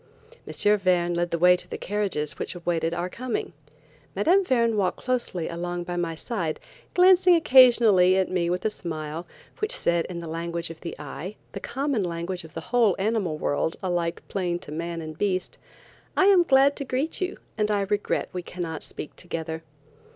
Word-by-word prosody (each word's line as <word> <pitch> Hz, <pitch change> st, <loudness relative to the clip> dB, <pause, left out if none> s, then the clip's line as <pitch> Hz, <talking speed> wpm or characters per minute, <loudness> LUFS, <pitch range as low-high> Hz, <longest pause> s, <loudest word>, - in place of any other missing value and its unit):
M. 210 Hz, 0 st, +2 dB
Verne 175 Hz, -2 st, +2 dB
led 175 Hz, 0 st, 0 dB
the 170 Hz, -, -1 dB
way 180 Hz, +2 st, +6 dB
to 180 Hz, -, -2 dB
the -, -, -5 dB
carriages 195 Hz, -8 st, -1 dB
which -, -, -4 dB
waited 165 Hz, -1 st, 0 dB
our 175 Hz, +1 st, -2 dB
coming. 245 Hz, +5 st, -4 dB, 0.6 s
Mme. 340 Hz, -, +4 dB
Verne 235 Hz, -, +2 dB
walked 195 Hz, -3 st, 0 dB
closely 240 Hz, -9 st, -2 dB
by 175 Hz, +1 st, -4 dB
my 170 Hz, -2 st, -2 dB
side, 170 Hz, -4 st, -3 dB, 0.4 s
glancing 365 Hz, 0 st, +6 dB
occasionally 235 Hz, -, +6 dB
at 190 Hz, -, +1 dB
me 175 Hz, -2 st, 0 dB
with 180 Hz, +3 st, -2 dB
a 220 Hz, -, +2 dB
smile, 160 Hz, -3 st, -5 dB, 0.3 s
which 430 Hz, -1 st, 0 dB
said 170 Hz, -1 st, +1 dB
in 180 Hz, -, -6 dB
the 170 Hz, -, -6 dB
language 170 Hz, +1 st, -4 dB
of 165 Hz, -, -12 dB
the 170 Hz, -, -6 dB
eye, 150 Hz, +7 st, -7 dB, 0.2 s
the -, -, -6 dB
common 270 Hz, -4 st, -1 dB
language 175 Hz, +1 st, -4 dB
of 160 Hz, -, -14 dB
the 165 Hz, -, -4 dB
whole 230 Hz, -6 st, +4 dB
animal 195 Hz, -6 st, 0 dB
world, 150 Hz, +2 st, -1 dB
alike 175 Hz, -2 st, -1 dB
plain 180 Hz, -3 st, -1 dB
to 150 Hz, -, -10 dB
man 165 Hz, +2 st, -4 dB
and 155 Hz, 0 st, -8 dB
beast: 185 Hz, -3 st, -1 dB, 0.6 s
"I 380 Hz, -, +5 dB
am 390 Hz, -2 st, +7 dB
glad 275 Hz, 0 st, +5 dB
to -, -, -3 dB
greet 275 Hz, +7 st, -2 dB
you, 370 Hz, 0 st, -2 dB, 0.2 s
and 210 Hz, -1 st, 0 dB
I 205 Hz, -1 st, +1 dB
regret 205 Hz, +1 st, -1 dB
we 180 Hz, -, -3 dB
cannot 170 Hz, -3 st, -5 dB
speak -, -, -7 dB
together." 160 Hz, -2 st, -5 dB
180 Hz, 180 wpm, -25 LUFS, 170-225 Hz, 0.6 s, am